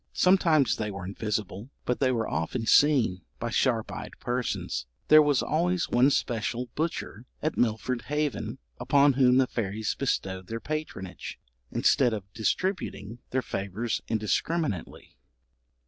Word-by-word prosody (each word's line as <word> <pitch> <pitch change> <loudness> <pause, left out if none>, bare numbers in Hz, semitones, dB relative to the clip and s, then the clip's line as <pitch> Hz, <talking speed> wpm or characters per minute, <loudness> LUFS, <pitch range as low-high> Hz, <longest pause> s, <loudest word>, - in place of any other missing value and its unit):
Sometimes 165 - +4
they 105 -1 -2
were 100 -2 -6
invisible, 105 +2 -3 0.2
but 125 - 0
they 130 -2 +3
were 115 -3 0
often 95 +9 -2
seen, 125 -10 +4 0.2
by 115 0 -3
sharp 115 -2 +1
eyed - - -7
persons. 120 - -2 0.2
There 155 0 +9
was 145 -3 +2
always 175 +3 0
one 125 +3 +5
special 120 -1 -1
butcher 145 -7 -3
at 155 - -1
Milford 120 +1 0
Haven 145 -6 -2 0.2
upon 140 -1 +4
whom 125 -1 +4
the 130 - +5
fairies 110 -3 -2
bestowed 95 -8 -2
their 115 +2 -4
patronage, 150 -11 -5 0.3
instead 125 -4 +3
of 105 - -5
distributing 120 - -2
their 130 0 0
favours 100 +4 -3
indiscriminately. 110 - -2
120 Hz, 130 wpm, -27 LUFS, 110-145 Hz, 0.3 s, There